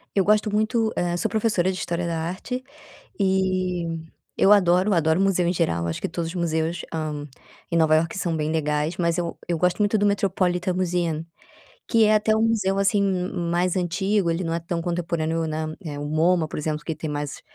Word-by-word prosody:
Eu 195 - +4
gosto 210 0 +3
muito, 220 +1 +1
eh, 175 0 0
sou - - -1
professora 205 -5 +1
de 185 - -5
história 170 0 -2
da 165 -1 -2
arte, 185 +10 -4 0.6
e 185 -2 +1 0.5
eu 200 - +5
adoro 185 0 +4
adoro 160 0 +2
museu 190 -3 +2
em 175 - +1
geral, 85 - 0
eu 85 - -2
acho 80 - -4
que - - -2
todos 165 -1 -3
os 180 - -8
museus, 165 0 -1
hã, 150 -2 -3 0.4
em 170 - +2
Nova 155 -1 +4
Iorque 165 +4 0
são 170 -4 -1
bem 155 0 -1
legais, 150 +1 -1
mas 170 0 +1
eu 170 -1 -3
eu 170 -2 0
gosto 180 +4 +1
muito 210 +1 +2
do 205 - +2
Metropolitam 185 -2 +1
Museum. 175 -3 -1 0.6
Que 230 -2 +4
é 215 0 +4
até 215 +1 +3
um 220 - +2
museu 195 -3 +1
assim, 200 +1 +3
ma 185 -2 0 0.2
mais 175 +1 +1
antigo, 190 +2 0
ele 175 +3 -1
não 165 - -2
é 170 - -1
tão 170 0 -3
contemporâneo 165 -2 -1
na 155 0 -3
eh, 145 -2 -5
o 145 - -4
MoMa, 160 +2 +2
por - - -5
exemplo, 150 0 -3
que 160 - -3
tem 155 - -5
mais 145 -1 -4
175 Hz, 210 wpm, -24 LUFS, 160-195 Hz, 0.6 s, eu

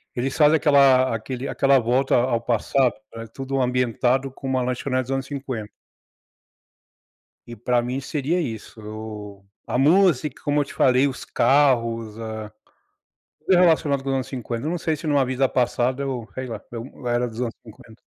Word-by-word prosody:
eles 130 +2 -2
fazem 155 +1 +5
aquela 135 -5 +4
aquele 125 +4 -5
aquela 135 -1 +3
volta 125 +3 +1
ao 120 -1 +1
passado. 125 +2 +1 0.2
É 115 0 -6
tudo 135 +4 -3
ambientado 125 +1 +1
como 130 0 -4
uma 130 - 0
lanchonete 130 +1 -1
dos 130 - -7
anos 135 0 -1
50. 130 -7 -5 1.8
E 120 - -8
pra 120 +2 0
mim 125 +3 -3
seria 150 +5 -1
isso, 110 - -7 0.2
a - - -1
música, 155 -2 +3
como 145 0 +1
eu - - +1
te - - -12
falei, 130 +2 +4
os 135 -2 -4
carros, 115 -6 +2
ah, 110 -1 -6 0.9
tudo 185 - +2
relacionado 155 -6 +3
com 135 - -4
os 135 - +1
anos 130 -1 -2
50, 120 -1 -5
eu - - 0
não 175 - -1
sei 160 -1 -1
se 155 - -6
numa 145 -3 +3
vida 130 +1 +1
passada 125 +1 0
eu 125 -5 -4
sei 130 0 -5
lá, 110 -3 -6
eu 120 +2 -8
era 120 0 +1
dos 115 0 -9
anos 120 -2 -2
50, 110 +1 -15
130 Hz, 170 wpm, -23 LUFS, 115-140 Hz, 1.8 s, fazem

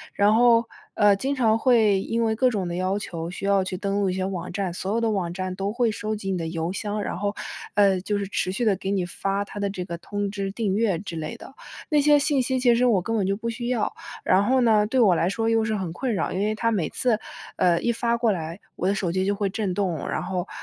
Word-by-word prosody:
然 205 +1 +4
后， 235 0 +5 0.3
呃， 205 -1 +5
经 270 +7 -2
常 225 -4 +2
会 220 -6 +4
因 230 +3 -1
为 220 -1 +1
各 255 +3 +3
种 200 -6 -2
的 170 - -4
要 185 +2 0
求， 170 -5 -5
需 195 +2 -6
要 200 -1 +3
去 185 0 -4
登 195 +1 -2
录 195 - +1
一 180 - -1
些 185 0 -1
网 180 -2 -4
站， 185 -1 -2
所 190 +3 -3
有 230 - +1
的 225 -1 +1
网 185 -4 -1
站 185 +1 -4
都 195 +2 -2
会 235 0 +1
收 215 +1 -3
集 195 -2 -4
你 185 - 0
的 165 - -3
邮 165 +1 -3
箱。 210 +1 -3
然 - - -3
后， 205 +1 -1 0.4
呃， 200 -2 +4
就 205 +2 -1
是 200 -1 -3
持 185 -1 -1
续 235 +5 -1
地 210 -3 +3
给 190 - -4
你 195 -2 0
发 195 +3 -2
它 205 - -8
的 200 0 0
这 185 -2 -5
个 170 -1 -5
通 205 +2 -3
知、 195 -1 -3
订 205 -2 -1
阅 210 -5 +1
之 170 -1 -7
类 155 -1 -5
的， - - -12 0.4
那 300 -1 +4
些 295 +1 +5
信 285 -1 +2
息 260 +1 0
其 245 -1 +4
实 245 +2 +3
我 210 -6 +3
根 225 - -2
本 200 -4 +1
就 195 - +1
不 230 +2 -3
需 235 +1 -5
要， 240 -4 0 0.3
然 185 +2 +4
后 255 +4 +3
呢， 215 -3 +4
对 260 +4 +1
我 210 -7 +6
来 170 +1 +1
说 225 +3 -1
又 225 -1 +3
是 220 0 -1
很 185 -5 -3
困 245 +4 -2
扰， - - -1
因 185 - -2
为 210 +2 0
它 230 +1 0
每 185 -8 0
次， 235 -4 0 0.4
呃， 175 -2 +3
一 240 - +1
发 235 0 0
过 230 -2 +2
来， 165 0 -4 0.2
我 180 - -1
的 200 - +2
手 185 -3 -1
机 185 +2 0
就 200 +1 +1
会 200 0 -1
震 195 -1 -2
动， 185 -7 -1
然 - - -2
后， 185 -1 -3
200 Hz, 295 characters per minute, -24 LUFS, 185-225 Hz, 0.4 s, 我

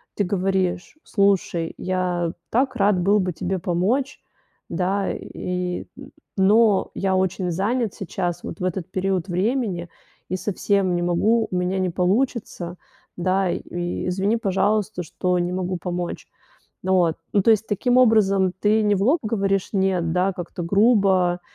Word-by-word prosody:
ты 205 - +1
говоришь: 190 - -1
"Слушай, 195 -5 +1
я 180 -2 -1 0.2
так 260 +4 +1
рад 200 -2 +3
был 200 +4 +3
бы 185 -2 0
тебе 185 +4 -2
помочь, 200 - 0 0.5
да, 190 +2 0
и 180 0 -4 0.5
но 205 +1 +4
я 190 -1 0
очень 185 -1 0
занят 215 +5 0
сейчас, 175 -1 -3
вот - - -7
в - - -5
этот 185 -1 -3
период 190 -1 -1
времени 190 -2 -1 0.4
и 185 - -1
совсем 195 -1 0
не 175 - -1
могу. 215 +7 +2
У 185 - -2
меня 180 +1 0
не 185 - 0
получится, 185 -2 -1 0.4
да, 185 +1 +1
и 175 +1 -4
извини, 195 +5 +1
пожалуйста, 205 -1 0
что 180 +2 -1
не 175 0 -1
могу 185 0 -2
помочь". 175 0 -4 0.6
Вот. 180 -3 +2 0.2
Ну 205 - +4
то 230 - +4
есть, 220 0 +3
таким 245 +5 +1
образом 200 -6 +4
ты 215 +1 +3
не 205 -1 +3
в 195 - -1
лоб 285 +10 +3
говоришь 195 -3 0
"нет", 190 -4 +1
да, 185 +2 +1
как-то 175 0 -6
грубо, 195 -2 +3
190 Hz, 150 wpm, -23 LUFS, 180-205 Hz, 0.6 s, но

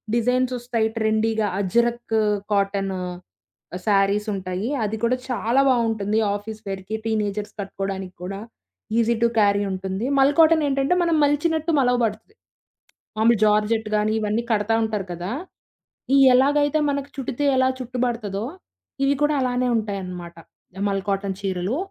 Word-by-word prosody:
Designs 250 +2 +1
వస్తాయి. 235 -2 -1
ట్రెండీగా 220 0 +1
'అజ్రఖ్' 235 +4 0 0.4
cotton, 195 -1 0 0.9
సారీసుంటాయి. 200 0 0 0.2
అది 210 +1 -2
కూడా 245 +2 +2
చాలా 245 +1 +1
బాగుంటుంది 225 -4 +1 0.2
ఆఫీస్ 215 +1 -7
వేర్‌కి, 195 +2 -4
టీనేజర్స్ 210 -1 -2
కట్టుకోవడానికి 195 -1 -5
కూడా 195 +2 -5 0.6
ఈజీ 235 0 +2
టు - - +6
క్యారీ 200 -1 +3
ఉంటుంది. 190 +3 -3
'మల్' 275 +2 +4
కాటన్ 320 -1 +6
ఏంటంటే, 275 +3 +1
మనం 335 -2 +2
మలిచినట్టు 315 +3 0
మలవబడతది. 245 - 0 0.8
మామూలు 225 0 +4
'జార్జెట్' 215 +1 +2
కానీ, 210 +1 +1
ఇవన్నీ 215 +2 0
కడతా 210 +1 +1
ఉంటారు 210 -3 -3
కదా! 175 +3 -5 1.0
ఎలాగైతే 290 +3 +3
మనకు 280 0 -2
చుట్టితే 275 +1 -3
ఎలా 260 0 +4
చుట్టు 255 0 -6
బడతాదో, 215 -5 -3 0.6
ఇవి 275 +1 +3
కూడా 295 0 +3
అలానే 250 0 0
ఉంటాయన్నమాట. 185 -5 -5 0.5
'మల్' 195 -1 -2
కాటన్ 195 -1 -1
చీరలు 190 +5 -2
220 Hz, 125 wpm, -23 LUFS, 200-250 Hz, 1.0 s, టు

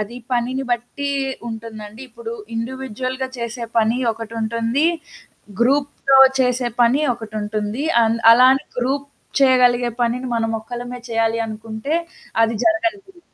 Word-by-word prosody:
అది 215 +4 -5 0.2
పనిని 255 +2 0
బట్టి 245 +4 -2 0.4
ఉంటుందండి. 220 -1 -8
ఇప్పుడు 465 - -8 0.2
ఇండివిడ్యువల్‌గా 260 +2 -4
చేసే 235 0 -4
పని 225 +3 +2
ఒకటుంటుంది. 230 +4 -1 0.7
గ్రూప్‌తో 275 +1 +3 0.2
చేసే 250 -1 +1
పని 240 +4 +4
ఒకటుంటుంది. 215 +1 -4 0.2
అన్ 225 0 +2
అలా 250 +2 +7
అని 270 - -4
గ్రూప్ 275 +3 -1 0.3
చేయగలిగే 250 -2 +4
పనిని, 245 +2 -1
మనం 225 -1 0
ఒక్కలమే 245 +2 -7
చేయాలి 225 0 +1
అనుకుంటే 220 +6 -5 0.5
అది 225 +1 +2
జరగనిది. 345 +2 -1
240 Hz, 110 wpm, -20 LUFS, 225-265 Hz, 0.7 s, అలా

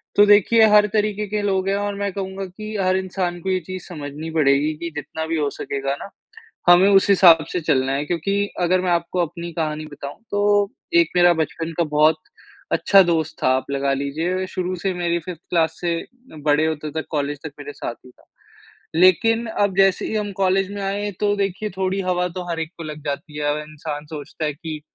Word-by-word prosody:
तो 205 - +7
देखिए 210 +2 +6
हर 210 0 +6
तरीक़े 210 -1 0
के 210 +1 -2
लोग 195 -2 0
हैं 195 - +1
और 205 0 -2
मैं 200 0 -2
कहूँगा 195 0 -4
कि 215 +4 -8
हर 185 0 +2
इंसान 185 -2 -3
को 190 - -3
ये 185 0 +1
चीज़ 185 -1 -6
समझनी 150 -2 -7
पड़ेगी 150 -1 +2
कि 170 +2 -5
जितना 160 +2 -5
भी 165 0 -1
हो 145 -2 0
सकेगा 140 0 -2
ना - - -8 0.6
हमें 175 +2 +7
उस 195 -1 +5
हिसाब 170 -5 +7
से 180 - -1
चलना 135 -4 +1
है। 140 +2 -1
क्योंकि 175 +4 -1 0.3
अगर 180 +1 +2
मैं 180 -1 -1
आपको 170 +1 0
अपनी 170 +1 -5
कहानी 155 -2 -3
बताऊँ 145 -1 -9
तो 205 0 +2 0.3
एक 335 - +2
मेरा 175 0 +6
बचपन 165 +1 -4
का 170 - +3
बहुत 155 +1 +5 0.6
अच्छा 195 -1 +5
दोस्त 165 -3 0
था - - +3
आप 130 - -5
लगा 140 0 0
लीजिए 160 +7 -2
शुरू 185 0 -3
से 195 - 0
मेरी 170 -1 0
5th 170 -1 -8
क्लास 165 -2 +1
से 175 -1 0 0.5
बड़े 150 +1 +3
होते 155 -1 -3
तक - - -9
कॉलेज 145 -1 -2
तक 160 - -6
मेरे 145 0 -7
साथ 120 - -5
ही 125 - -14
था। - - -25 0.7
लेक़िन 185 +7 +4
अब 205 -4 0
जैसे 195 -1 +3
ही - - -4
हम 210 -1 -2
कॉलेज 190 +1 +2
में 205 -1 -5
आए 200 +1 -2
तो 205 -1 +2
देखिए 200 +1 -2
थोड़ी 190 +1 -1
हवा 180 0 +1
तो - - -3
हर 165 -1 -2
एक 160 -1 -3
को 170 - -8
लग 155 -1 -7
जाती 150 +1 -5
है। 150 - -2
अब 150 - -2
इंसान 150 -1 -6
सोचता 150 +1 -7
है 150 - 0
कि 155 +1 -7
175 Hz, 210 wpm, -21 LUFS, 155-195 Hz, 0.7 s, तो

